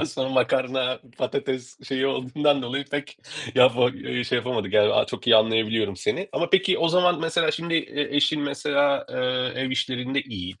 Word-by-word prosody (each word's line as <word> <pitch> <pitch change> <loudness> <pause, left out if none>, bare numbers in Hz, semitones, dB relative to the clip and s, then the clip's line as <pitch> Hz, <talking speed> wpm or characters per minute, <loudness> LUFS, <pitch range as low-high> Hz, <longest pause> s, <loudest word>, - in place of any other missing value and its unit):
ondan - - +1
sonra 130 0 -3
makarna, 130 0 0 0.2
patates 130 0 -3
şeyi 135 0 0
olduğundan 140 +2 0
dolayı 135 +3 -3
pek 145 +1 -6 0.4
yapa 125 0 +5 0.3
şey 125 - 0
yapamadık, 120 -6 -3
yani, 105 -1 +4
çok - - -8
iyi 120 -2 +7
anlayabiliyorum 110 -2 +1
seni. 185 - -2
Ama 170 - -1
peki 190 0 +3
o 165 - +2
zaman 180 -1 +3
mesela 165 0 +1
şimdi 165 0 -3
e 145 -2 -1
eşin 150 +1 +2
mesela, 140 0 0
ııı, 125 0 -1
ev 130 0 -2
işlerinde 130 +1 -1
iyi 95 -5 -8
130 Hz, 165 wpm, -24 LUFS, 125-145 Hz, 0.4 s, iyi